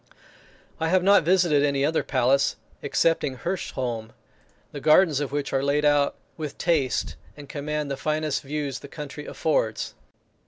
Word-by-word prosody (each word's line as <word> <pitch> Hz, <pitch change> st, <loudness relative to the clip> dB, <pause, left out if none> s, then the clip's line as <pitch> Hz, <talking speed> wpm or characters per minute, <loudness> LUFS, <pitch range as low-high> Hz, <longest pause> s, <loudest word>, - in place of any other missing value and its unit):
I 160 Hz, -, 0 dB
have 185 Hz, +1 st, +3 dB
not 200 Hz, +2 st, +6 dB
visited 170 Hz, -3 st, +3 dB
any 140 Hz, -1 st, +2 dB
other 160 Hz, +2 st, +1 dB
palace, 135 Hz, +1 st, +2 dB, 0.3 s
excepting 160 Hz, -5 st, +1 dB
Hirsholm, 125 Hz, -10 st, -4 dB, 0.6 s
the 145 Hz, -, -6 dB
gardens 155 Hz, 0 st, +4 dB
of 145 Hz, -2 st, -3 dB
which 145 Hz, -1 st, -3 dB
are 135 Hz, -, +2 dB
laid 145 Hz, +2 st, +1 dB
out 145 Hz, -1 st, +3 dB, 0.2 s
with 150 Hz, -3 st, -5 dB
taste, 155 Hz, -7 st, 0 dB, 0.2 s
and 145 Hz, -1 st, -10 dB
command 150 Hz, 0 st, -3 dB
the 135 Hz, -, -2 dB
finest 155 Hz, -1 st, -1 dB
views 140 Hz, -2 st, -4 dB
the -, -, -10 dB
country 150 Hz, 0 st, -8 dB
affords. 110 Hz, -9 st, -1 dB
145 Hz, 150 wpm, -25 LUFS, 140-155 Hz, 0.6 s, not